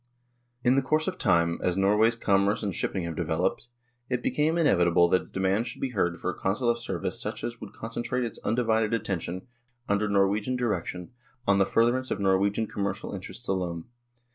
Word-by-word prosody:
In 125 - +4
the 135 - +3
course 155 +4 0
of 185 -1 -3
time, 85 -3 +2
as 90 0 0
Norway's 105 +4 +4
commerce 100 -1 +2
and 100 -3 -1
shipping 95 +2 -2
have 85 -1 -4
developed, - - -1 0.4
it 125 -1 -1
became 155 +3 +1
inevitable 85 - +4
that 90 - +3
a - - -13
de - - -7
mand 95 +5 +1
should 120 - -7
be 135 - -2
heard 85 -7 0
for 90 - -1
a - - -9
Consular 120 +5 +1
service 115 -7 -3
such - - -4
as 120 0 -3
could 100 - -10
concentrate 120 +2 -3
its 115 - -5
undivided 110 -1 +1
attention, 95 -4 -3 0.4
under 100 +1 +1
Nor 100 -1 +4
wegian 105 +6 -1
direction, 90 -7 -2 0.3
on 100 0 +3
the 95 - +3
furtherance 120 +3 +2
of - - -2
Norwegian 100 +3 +2
commercial 100 -1 -3
interests 100 +5 -7
alone. 90 -3 -2
100 Hz, 190 wpm, -27 LUFS, 95-120 Hz, 0.4 s, In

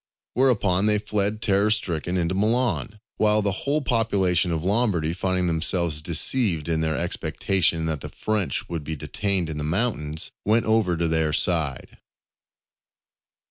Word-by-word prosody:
Whereupon 105 -6 +2
they 105 0 +3
fled 105 +1 -1
terror 100 0 +2
stricken 90 -4 -1
into 85 0 -1
Milan; 105 - 0 0.2
while 105 0 +3
the 100 - +1
whole 140 +10 -1
population 100 - +1
of 80 -1 -2
Lombardy, 95 -6 0
finding 95 0 -1
themselves 85 -1 +1
deceived 85 - +2
in 80 -1 0
their 80 -1 -1
expectation 85 -4 0
that 80 -4 -3
the - - -7
French 105 -4 -2
would 85 -3 -5
be 80 +2 -5
detained 95 +4 -2
in 75 -1 -5
the - - -3
mountains, 80 -4 -2
went 110 +2 +2
over 110 -6 +1
to 85 0 0
their 80 -1 0
side. 80 -7 -1
95 Hz, 145 wpm, -23 LUFS, 80-105 Hz, 0.2 s, they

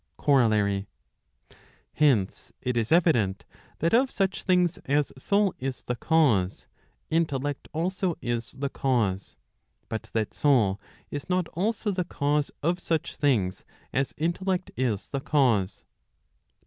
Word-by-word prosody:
COROLLARY. 105 -7 +2 1.1
Hence, 130 -11 +1
it 125 -1 -2
is 115 -1 0
evident, 120 - +3 0.3
that 165 +5 0
of 255 +3 +4
such 195 -4 -1
things 180 -2 +2
as 145 +1 +1
soul 200 +8 +1
is 130 0 -4
the 125 - -2
cause, 120 - +2 0.5
intellect 145 -4 -1
also 180 +1 -1
is 120 -1 -2
the 140 +1 -3
cause; 110 -9 -1 0.5
but 110 - -5
that 110 -2 -1
soul 110 -9 +2 0.3
is 145 +4 -5
not 180 -2 +1
also 205 +4 -1
the 180 -2 -1
cause 145 -3 0
of 175 +3 +1
such 165 -3 -2
things 110 -11 +1 0.3
as 135 +1 -1
intellect 185 +4 -1
is 115 -6 -1
the 140 - -3
cause. 120 -11 +1
145 Hz, 125 wpm, -27 LUFS, 115-170 Hz, 1.1 s, of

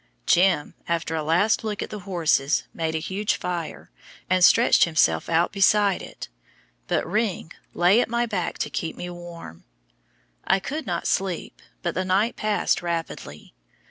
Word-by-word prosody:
"Jim," 180 -4 +3
after 170 -1 -1
a 160 - -1
last 175 +10 +2
look 210 -2 -3
at - - -8
the 210 - -5
horses, 160 -5 +1
made 160 -1 -2
a - - +2
huge 190 +6 -1
fire, 175 -3 -5 0.4
and 185 -1 +3
stretched 230 +7 +6
himself 120 - +1
out 170 +1 +2
beside 200 0 +3
it, - - -9 0.6
but - - 0
"Ring" 210 -6 -1 0.2
lay 185 +7 +5
at - - -2
my 235 +1 +1
back 195 -7 -3
to 150 - -3
keep 160 +5 -3
me 175 0 -6
warm. 170 - -10 0.8
I - - +3
could 300 +11 -5
not - - -2
sleep, 190 -3 -2 0.2
but 170 - -1
the 185 - -1
night 195 +5 +1
passed 215 -1 0
rapidly. 170 -1 -5
180 Hz, 160 wpm, -24 LUFS, 165-205 Hz, 0.8 s, stretched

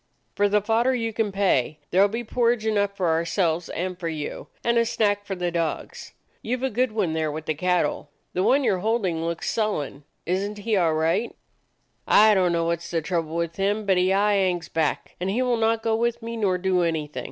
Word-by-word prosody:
"For 205 0 +2
the 210 0 +2
fodder 235 +4 +2
you 230 -2 -2
can 215 -2 -1
pay. 185 -8 +1
There 195 +3 +5
be 230 +4 -4
porridge 235 -1 +1
enough 205 -2 0
for 180 -3 +1
ourselves 165 +1 0
and 180 +1 -4
for 170 - -3
you, 155 -2 -5 0.2
and 235 0 +3
a 230 - +3
snack 205 -3 0
for 195 - -4
the 180 -1 -2
dogs. 165 -2 -4 0.3
You 245 +3 -2
've 255 - -9
a 265 - +1
good 245 +2 +1
one 200 -7 -1
there 160 -1 -1
with 155 +1 -6
the 155 - 0
cattle. 170 -3 0 0.2
The 180 - 0
one 275 +8 +3
you 245 - +3
're 185 - -2
hold 220 +2 0
ing 165 -3 -1
looks 170 0 -3
sullen. 150 -10 -2 0.2
Is 185 +3 0
n't 210 - -9
he 215 +1 -1
all 170 -4 +2
right? 165 +9 0 0.7
"I 215 +1 +6
don't 185 -3 +2
know 170 -1 0
what 170 0 -1
's 170 - -9
the 165 -2 -1
trouble 165 -2 -2
with 170 -1 -2
him, 205 +2 0
but 190 -2 +3
he 180 +1 +3
aye 205 +2 +3
hangs 180 -3 0
back, 160 -2 -1
and 180 +2 -2
he 235 +6 +1
will 250 -1 +1
not 225 0 +1
go 225 -1 +1
with 235 +1 -1
me 230 0 -5
nor 200 -5 +1
do 185 0 +1
anything. 155 -5 -2
190 Hz, 230 wpm, -24 LUFS, 170-220 Hz, 0.7 s, I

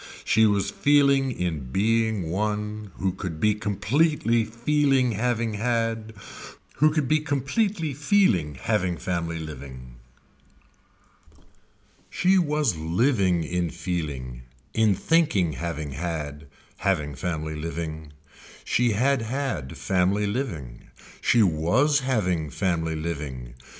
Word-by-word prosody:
She 110 0 +4
was 100 -2 +1
feeling 140 -2 +3
in 80 - -3
being 110 - +1
one 105 +1 -2
who 95 0 -1
could 90 -3 -6
be 105 +4 +3
completely 115 - +1
feeling 130 +3 +1
having 115 0 -1
had, 115 0 -1 0.6
who 155 +2 +5
could 150 -3 0
be 155 +3 +3
completely 155 - -1
feeling 130 - +2
having 90 - -1
family 85 -2 -2
living. 65 -6 -9 2.1
She 190 +1 +3
was 150 - +1
living 90 - +1
in 90 +1 -1
feeling, 75 -8 -4 0.3
in 110 -3 +3
thinking 125 - +2
having 80 -3 -4
had, 75 -1 -5 0.3
having 75 -7 0
family 80 +1 -3
living. 80 -1 -5 0.5
She 120 -2 +2
had 130 +4 +2
had 110 - -3
family 95 +2 +1
living. 85 - -4 0.3
She 120 -2 +4
was 105 - +2
having 90 - 0
family 80 0 -1
living. 70 -7 -5
100 Hz, 110 wpm, -25 LUFS, 80-125 Hz, 2.1 s, who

